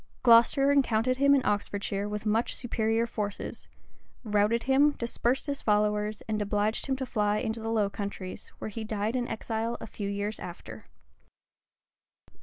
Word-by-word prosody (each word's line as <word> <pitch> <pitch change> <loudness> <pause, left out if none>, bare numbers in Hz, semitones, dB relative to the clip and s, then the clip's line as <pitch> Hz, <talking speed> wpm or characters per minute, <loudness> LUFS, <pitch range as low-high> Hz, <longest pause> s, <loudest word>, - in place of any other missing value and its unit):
Glocester 240 +4 +6
encountered 255 -2 +2
him 280 +1 +5
in 270 - +1
Oxfordshire 205 0 -1
with 210 +1 -4
much 220 +2 +1
superior 225 -1 0
forces; 210 -3 -5 0.6
routed 210 +1 +2
him, 280 +3 +4
dispersed 240 +1 -1
his 285 -2 -3
followers, 210 0 +1
and 215 -1 -1
obliged 210 +3 0
him 265 - +1
to 265 0 -3
fly 210 -3 0
into 220 +1 -2
the 225 0 -4
Low 220 -3 +2
Countries, 200 -2 -6
where - - -5
he 220 +2 -5
died 215 +1 -2
in 245 -1 -1
exile 225 +1 -3
a - - -6
few 205 -2 -5
years 205 +1 -3
after. 175 -1 -9
220 Hz, 155 wpm, -28 LUFS, 210-240 Hz, 0.6 s, Glocester